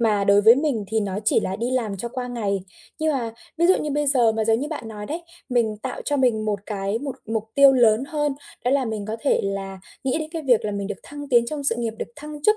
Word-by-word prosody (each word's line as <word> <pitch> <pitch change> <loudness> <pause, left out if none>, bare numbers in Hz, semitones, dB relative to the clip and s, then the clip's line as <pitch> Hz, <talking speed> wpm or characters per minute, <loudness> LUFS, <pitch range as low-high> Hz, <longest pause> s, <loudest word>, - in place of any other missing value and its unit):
mà 210 -3 +2
đối 200 +1 +5
với 220 +3 +8
mình 270 -7 0
thì 220 +2 +1
nó 200 -1 -2
chỉ - - +4
là 190 +1 -3
đi 235 +3 -2
làm 230 -6 -1
cho 235 +5 -4
qua 250 +1 -4
ngày. 205 -5 -1 0.4
Nhưng 315 0 +1
mà 235 -4 -2 0.3
ví 340 - +4
dụ 375 - +5
như 300 - -3
bây 295 +1 0
giờ 245 -5 +4
mà 220 0 -1
giống 225 +2 +2
như 295 - -3
bạn 295 -8 -5
nói 210 -1 -7
đấy, 335 +3 -4 0.3
mình 230 -4 +1
tạo 255 +5 -5
cho 290 - 0
mình 240 -5 +2
một 205 -2 -1
cái 200 +1 -2
một 270 -1 -5
mục 220 -1 -2
tiêu 280 -1 +8
lớn 240 -1 +4
hơn 295 -1 -1 0.3
đó 250 - +2
là 275 -1 +2
mình 220 -3 -3
có 220 +1 -3
thể 280 - +2
là 195 -1 -4 0.2
nghĩ 265 +4 +1
đến 310 0 -4
cái 325 -2 -4
việc 245 -5 +3
là 210 - -1
mình 200 -1 -3
được 205 - -5
thăng 290 -1 -9
tiến 240 -2 +4
trong 290 +1 -4
sự 230 - +3
nghiệp, 230 -1 -1
được - - -4
thăng 295 0 -8
chức 425 +4 +4
235 Hz, 275 wpm, -23 LUFS, 215-280 Hz, 0.4 s, với